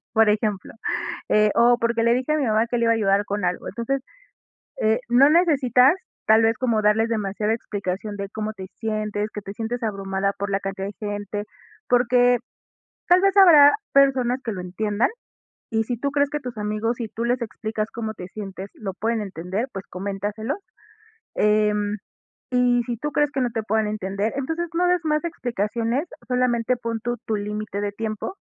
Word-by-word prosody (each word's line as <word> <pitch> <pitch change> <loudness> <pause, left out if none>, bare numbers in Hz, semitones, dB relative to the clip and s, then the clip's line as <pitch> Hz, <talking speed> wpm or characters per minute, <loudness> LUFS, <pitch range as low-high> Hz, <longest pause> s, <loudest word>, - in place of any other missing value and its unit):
Por 225 -2 +4
ejemplo, 210 -2 0 0.6
eh, 210 0 +4
o: 240 +1 +5
"Porque 230 -1 +1
le 235 +1 +4
dije 255 +4 0
a 310 - +2
mi 285 - 0
mamá 220 +1 +2
que 240 - -2
le 235 - +1
iba 230 - +5
a - - +2
ayudar 200 -1 +2
con 205 -1 -2
algo". 180 0 -2
Entonces, 250 +5 -2 0.8
eh, 220 +2 +3
no 260 +4 +6
necesitas 280 -5 +5 0.3
tal 220 +1 +6
vez 225 0 +3
como 230 -4 +1
darles 220 +2 +3
demasiada 210 -1 -1
explicación 205 -2 -4
de 200 -1 -5
cómo 215 0 -3
te 190 -3 -8
sientes, 215 -1 -2
que 210 - -5
te 195 - -8
sientes 230 +3 -4
abrumada 195 -2 -1
por 200 0 -3
la 195 - +1
cantidad 195 0 -4
de 205 - -7 0.2
gente. 205 0 -4 0.5
Porque 245 0 +4 0.7
tal 355 +1 +6
vez 390 0 +3
habrá 305 -7 +9 0.2
personas 265 -2 +4
que 230 - -3
lo 195 - -5
entiendan, 205 +4 0 0.6
y 225 0 +1
si 245 0 -3
tú 280 +4 -2
crees 285 -1 +2
que 295 - -2
tus 250 -2 -6
amigos, 215 +3 -1
si 235 - -4
tú 230 +2 -4
les 245 +1 0
explicas 220 -1 -3
cómo 220 -1 -4
te 180 -3 -8
sientes, 195 -1 -7
lo 195 -4 -5
pueden 225 +2 -1
entender, 195 +4 -3
pues 195 0 -6
coméntaselos. 205 - -3 0.8
Em, 210 0 +2 0.5
y 250 -1 +3
si 240 - -2
tú 295 +3 -3
crees 295 0 +2
que 270 - -1
no 245 -1 +1
te 225 -2 -2
puedan 220 0 +1
entender, 205 +1 -2
entonces 325 +5 -2
no 355 +1 +2
des 360 0 +3
más 305 +1 +1
explicaciones, 235 - -2 0.2
solamente 250 -1 +1
pon 230 -1 -3
tú 240 0 -2
tu 220 - 0
límite 210 0 -4
de 205 0 -2
tiempo, 220 - -4
225 Hz, 185 wpm, -23 LUFS, 205-250 Hz, 0.8 s, habrá